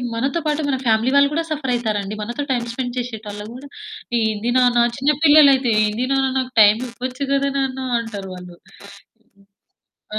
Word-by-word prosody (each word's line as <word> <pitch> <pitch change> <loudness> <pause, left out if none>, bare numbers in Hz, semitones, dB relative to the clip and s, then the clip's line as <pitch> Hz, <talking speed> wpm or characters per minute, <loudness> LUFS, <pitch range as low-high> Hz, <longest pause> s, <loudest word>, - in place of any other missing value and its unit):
మనతో 275 +8 -1
పాటు 300 0 -1
మన 265 -1 -1
ఫ్యామిలీ 225 +4 +2
వాళ్ళు 280 +1 +4
కూడా 330 +1 -1
సఫరయితారండి. 225 -8 -2
మనతో 240 +6 -4
టైమ్ 240 -2 -1
స్పెండ్ 250 0 -4
చేసేటోళ్ళు 215 -4 -7
గూడా, 275 +3 -11 0.5
"ఏంది 220 +2 -1
నాన్న" 240 -1 +3
చిన్న 285 +2 +2
పిల్లలైతే 280 -5 +6
"ఏంది 225 +5 -2
నాన్న 270 0 +1
నాకు 255 0 -4
టైమివ్వొచ్చు 250 +5 +1
గదా 275 0 +1
నాన్న" 265 -1 -2 0.2
అంటారు 200 -4 -7
వాళ్ళు. 180 -1 -12 1.6
ఆ! - - +1
250 Hz, 145 wpm, -20 LUFS, 220-275 Hz, 1.6 s, పిల్లలైతే